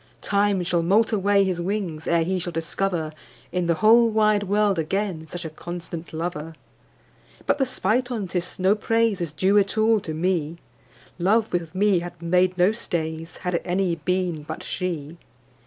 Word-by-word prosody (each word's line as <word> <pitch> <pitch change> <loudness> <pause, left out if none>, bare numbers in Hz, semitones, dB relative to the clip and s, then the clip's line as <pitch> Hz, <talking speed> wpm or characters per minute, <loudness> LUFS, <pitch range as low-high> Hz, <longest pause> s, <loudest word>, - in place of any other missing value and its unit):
â¢ - - -32
Time 200 -2 +1
shall 175 -1 +1
moult 205 +7 +3
away 200 -1 +3
his 185 -3 -1
wings, 180 -4 -3
Ere 170 -1 +3
he 185 +2 -1
shall 175 0 -4
discover 165 0 -2 0.4
In 180 -1 -1
the 170 - +2
whole 230 +5 +5
wide 215 -1 +3
world 205 -2 +1
again 170 0 -2
Such 175 +1 -6
a - - -3
constant 170 +1 -7
Lover. 160 -1 -4 0.9
But - - +1
the 270 - +2
spite 245 0 0
on't 205 -7 -4
is, 180 0 -2
no 190 +2 +3
praise 225 -2 +1
Is 170 -4 -2
due 190 +7 +3
at 200 +1 -1
all 220 0 +4
to 160 -5 -6
me: 170 -2 -1 0.6
Love 215 +5 +2
with 175 0 -2
me 200 -1 +3
had 175 0 -8
made 180 +2 +2
no 180 +3 +4
stays, 165 -6 -3
Had 180 - 0
it 170 - 0
any 180 0 0
been 180 -1 -1
but 150 - -7
she. 170 -3 -4
180 Hz, 180 wpm, -24 LUFS, 170-205 Hz, 0.9 s, whole